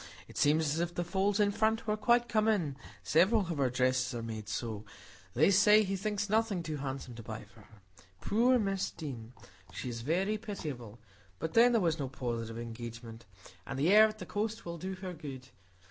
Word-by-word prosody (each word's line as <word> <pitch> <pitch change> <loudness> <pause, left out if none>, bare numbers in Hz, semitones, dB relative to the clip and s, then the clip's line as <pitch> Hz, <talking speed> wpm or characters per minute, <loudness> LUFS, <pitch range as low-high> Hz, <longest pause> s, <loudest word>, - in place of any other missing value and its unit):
It - - -14
seems 155 +2 +3
as 160 - -2
if 175 0 -2
the 175 - -1
folds 195 +4 0
in 205 -1 +4
front 220 +2 +1
were 210 -1 +1
quite 240 +3 +3
come 220 -2 +1
in; 175 -11 +1 0.3
several 180 - +4
of 170 -5 -3
her 135 -2 +3
dresses 130 0 +1
are 115 - -4
made 110 -2 -6
so,—they 110 - -2
say 210 +2 +6
he 195 -1 -2
thinks 205 +1 -2
nothing 215 -4 +1
too 155 -2 -4
handsome 135 -2 -5
to 115 - -9
buy 110 0 -7
for 105 +2 -19
her. 105 -1 -19 0.4
Poor 240 - +3
Miss 195 -4 -1
Deane! 125 -8 -7 0.4
She 125 - -5
is 115 -1 -5
very 190 - 0
pitiable; 145 - -6 0.4
but 160 +11 -4
then 240 +2 +6
there 230 -2 +3
was 165 -2 +1
no 135 -2 -2
positive 115 -3 -4
engagement; 115 0 -8 0.4
and - - -4
the 160 +8 +3
air 215 +1 +8
at 215 0 -7
the - - -7
coast 220 +2 -3
will 170 -1 -6
do 190 +2 -4
her 185 -1 -6
good. 135 -5 -9
165 Hz, 200 wpm, -32 LUFS, -, 0.4 s, air